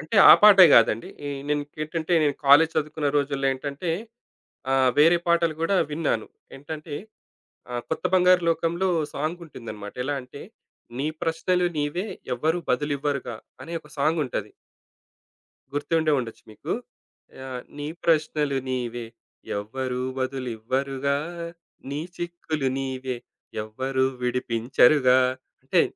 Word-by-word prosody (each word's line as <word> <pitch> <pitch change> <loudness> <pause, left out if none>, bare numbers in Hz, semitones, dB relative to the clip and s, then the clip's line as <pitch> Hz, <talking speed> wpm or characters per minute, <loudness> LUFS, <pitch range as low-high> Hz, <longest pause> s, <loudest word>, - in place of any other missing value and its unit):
అంటే 155 +8 -3
ఆ - - +13
పాటే 200 -3 +10
గాదండి. 115 0 +4 0.2
ఎ - - -3 0.2
నే - - +2
ఇంకేంటంటే, 155 +3 -3 0.3
కాలేజ్ 160 +4 +7
చదువుకున్న 150 -1 -1
రోజుల్లో 140 -1 -1
ఏంటంటే, 140 +5 -4 0.8
ఆహ్, 130 -1 +4
వేరే 165 +3 +6
పాటలు 170 -2 +2
కూడా 180 +4 +2 0.2
విన్నాను. 150 -8 -1 0.3
ఏంటంటే, 150 +1 -7 0.8
ఆ! - - -6 0.2
'కొత్త 160 - -3
బంగారు 180 -1 +5
లోకంలో' 170 +3 0 0.3
సాంగుంటుందనమాట. 140 -10 -6
ఎలా 145 +1 -1
అంటే, 135 +3 -12 0.6
'నీ 145 - -1 0.2
ప్రశ్నలు 175 +2 +1
నీవే 150 +8 -1 0.3
ఎవ్వరు 160 +7 0
బదులు 145 +3 +1
ఇవ్వరుగా.' 140 -5 -3 0.3
అనే 170 - -8
ఒక 150 - -18
సాంగుంటది. 150 -2 0 1.2
గుర్తుండే 155 +1 +1
ఉండొచ్చు 115 -3 -6
మీకు. 140 +9 -5 0.7
ఆహ్, 130 -1 -5 0.2
నీ 145 - -4 0.2
ప్రశ్నలు 150 -3 +1
నీవే 120 -2 -3 0.5
ఎవ్వరూ 125 +4 -4 0.2
బదులు 130 -1 -3
ఇవ్వరుగా, 135 +4 -1 0.7
నీ 145 - -3 0.2
చిక్కులు 170 -5 -3
నీవే 130 -1 -3 0.5
ఎవ్వరూ 130 +4 -1 0.2
విడిపించరుగా. 125 +2 +3 0.4
అంటే - - +2
145 Hz, 115 wpm, -25 LUFS, 130-160 Hz, 1.2 s, ఆ